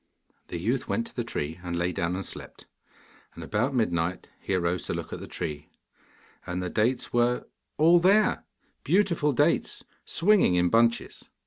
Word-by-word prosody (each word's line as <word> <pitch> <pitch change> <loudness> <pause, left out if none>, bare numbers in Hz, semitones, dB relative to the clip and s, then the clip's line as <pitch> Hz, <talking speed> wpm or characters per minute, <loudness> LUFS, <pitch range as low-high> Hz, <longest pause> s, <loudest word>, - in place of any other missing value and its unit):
The - - -5
youth 115 +9 -1
went 230 - -1
to 230 - -11
the 120 - -1
tree, 80 -7 -4
and 85 -1 -4
lay 85 +1 0
down 85 +1 -2
and 95 - -4
slept. - - -10 0.7
And 85 - -8
about 110 - -1
midnight 90 -6 -1
he 95 - -2
arose 85 0 0
to - - -2
look - - -6
at - - -5
the - - -8
tree, 75 -1 -5 0.7
and 90 +1 -4
the 90 -1 -3
dates 120 +4 0
were 120 +1 +2 0.3
all 170 +3 +6
there 200 +5 +3 0.4
beautiful 175 -6 +2
dates, 125 - +1 0.2
swinging 185 - +3
in 90 0 +3
bunches. 115 +3 +1
110 Hz, 165 wpm, -27 LUFS, 90-145 Hz, 0.7 s, all